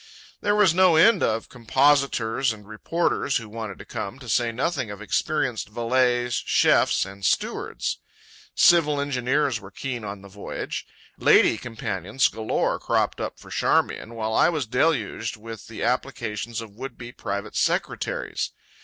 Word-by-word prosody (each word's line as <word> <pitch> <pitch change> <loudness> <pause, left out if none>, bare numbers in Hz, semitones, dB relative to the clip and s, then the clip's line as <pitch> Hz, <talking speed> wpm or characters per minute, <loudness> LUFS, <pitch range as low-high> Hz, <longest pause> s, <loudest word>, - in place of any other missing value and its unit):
There 205 0 +2
was 205 -5 +5
no 185 -2 +5
end 195 +6 +6
of 110 0 0
compositors 130 -1 +2
and 105 -2 -10
reporters 140 +6 0
who 115 -3 -7
wanted 110 -2 -6
to - - -11
come, 100 +6 -5
to 130 -2 -12
say 115 +1 +1
nothing 130 0 -1
of 100 -1 -7
experienced 120 +1 -1
valets, 120 +1 +1
chefs, - - +3
and 100 0 -11
stewards. - - -1 0.6
Civil 150 -4 +5
engineers 135 -2 0
were 95 - -11
keen 120 +3 -5
on 100 -1 -6
the - - -11
voyage; 100 +1 -6 0.3
"lady" - - +5
companions 110 -1 -1
galore 110 0 -1
cropped - - 0
up - - -4
for - - -14
Charmian; 115 - 0
while 110 -1 -2
I - - +5
was 155 -6 -1
deluged 115 -3 0
with 115 0 -9
the 115 - -6
applications 120 -2 -2
of 110 -2 -10
would 125 +5 -8
be 120 0 -8
private 100 -3 -5
secretaries. - - -1
120 Hz, 150 wpm, -24 LUFS, 110-135 Hz, 0.6 s, end